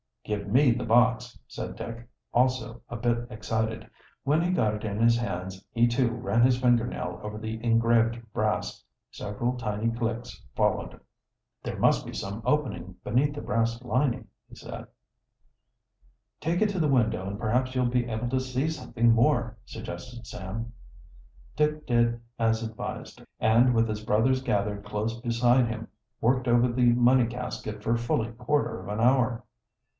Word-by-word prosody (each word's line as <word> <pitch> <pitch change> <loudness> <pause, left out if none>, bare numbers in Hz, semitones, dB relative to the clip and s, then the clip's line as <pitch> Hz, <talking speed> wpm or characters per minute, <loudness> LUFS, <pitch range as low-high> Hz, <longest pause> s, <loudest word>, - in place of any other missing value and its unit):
"Give 105 -1 -3
me 125 +5 +5
the 125 +2 -1
box," 120 0 +3
said - - -6
Dick, 115 +1 -7 0.3
also 120 -2 +1
a - - -5
bit 120 0 0
excited. 110 0 -2 0.4
When 150 +4 +2
he 175 - 0
got 110 -12 +2
it 105 - -7
in 105 -1 -3
his 115 0 +5
hands 95 -4 -4
he, 120 0 +4
too, 120 +1 +2
ran 115 -1 0
his 125 0 +4
finger 120 -2 +3
nail - - -5
over 105 0 -6
the 110 +1 -5
engraved 115 0 +3
brass. - - -1 0.3
Several 120 +5 -3
tiny 110 -1 -1
clicks 115 -1 -4
followed. - - 0 0.6
"There - - -5
must - - +3
be - - -7
some 100 +3 -5
opening 140 -11 -1
beneath 140 +6 +1
the 145 - -5
brass 115 +1 0
lining," 125 -2 0 0.2
he - - -14
said. - - -8 1.5
"Take 170 +4 0
it 215 - +2
to 195 -2 -2
the 155 - +3
window, 110 -8 +1
and 100 +1 -4
perhaps 125 +4 0
you'll 125 -1 +2
be 120 0 +1
able 115 +2 -2
to 130 +1 +1
see 130 +3 -1
something 120 -7 +1
more," 115 -1 +2
suggested 120 +1 -8
Sam. 110 +5 -6 0.8
Dick 150 0 0
did 120 -1 +2 0.2
as 115 0 +2
advised, 110 -1 -6 0.2
and, 120 +3 +4
with 115 0 +3
his 105 -1 -4
brothers 125 +5 +2
gathered 105 -4 -1
close 110 +3 -3
beside 120 +1 +3
him, 115 0 -5 0.3
worked 130 +2 +2
over 120 +1 +4
the 120 -1 +4
money 125 0 +4
casket 115 -3 -5
for 115 +1 +2
fully 115 -1 -1
quarter 125 +5 -1
of - - -10
an 105 +1 -3
hour. 125 0 +3
120 Hz, 160 wpm, -27 LUFS, 110-125 Hz, 1.5 s, me